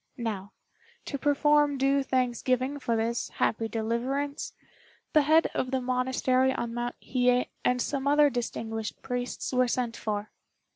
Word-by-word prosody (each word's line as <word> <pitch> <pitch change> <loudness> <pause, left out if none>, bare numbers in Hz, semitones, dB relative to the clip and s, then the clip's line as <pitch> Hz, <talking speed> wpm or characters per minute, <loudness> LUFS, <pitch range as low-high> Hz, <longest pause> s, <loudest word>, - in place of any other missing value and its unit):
Now, 210 -5 -4 0.5
to 280 - -4
perform 295 0 +3
due 275 +1 +3
thanksgiving 255 +1 0
for 235 -4 0
this 230 +1 -1
happy 225 0 0
deliverance, 245 +6 -2 0.6
the 305 - +6
head 315 +3 +4
of 255 - -1
the 265 0 0
monastery 255 +1 +1
on 235 -2 -3
Mount 240 0 -3
Hiye 250 -1 +2
and 250 0 +2
some 275 +2 -1
other 290 0 +5
distinguished 225 -3 -4
priests 245 +1 -3
were 255 0 +3
sent 240 -1 -1
for. 210 -1 -3
255 Hz, 140 wpm, -28 LUFS, 235-275 Hz, 0.6 s, the